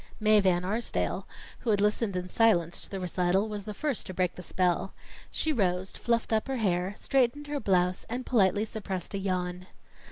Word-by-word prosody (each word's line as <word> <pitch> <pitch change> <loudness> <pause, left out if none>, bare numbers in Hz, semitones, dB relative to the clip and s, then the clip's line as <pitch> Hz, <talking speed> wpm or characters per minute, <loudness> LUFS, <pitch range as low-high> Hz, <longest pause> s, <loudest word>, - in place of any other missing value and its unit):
Mae 215 -1 +5
Van 180 -2 +2
Arsdale, 220 +5 -2 0.3
who 240 - -3
had 205 -2 +3
listened 210 0 +1
in 180 0 -2
silence 180 -5 +2
to - - -8
the 195 - -4
recital, 180 +2 +1
was 210 -2 -5
the 210 - -5
first 285 -3 -2
to 185 - -6
break 180 -1 +1
the - - -9
spell. 180 +1 0 0.3
She 315 - 0
rose, 190 -5 0
fluffed 230 -1 -1
up 220 +3 +1
her 270 -1 -1
hair, 185 -2 0
straightened 270 +2 +1
her 290 0 -3
blouse, 185 -4 +1
and 245 +2 -3
politely 205 -2 +3
suppressed 195 -4 -5
a 200 - -1
yawn. 180 -1 -2
200 Hz, 190 wpm, -29 LUFS, 180-225 Hz, 0.3 s, Mae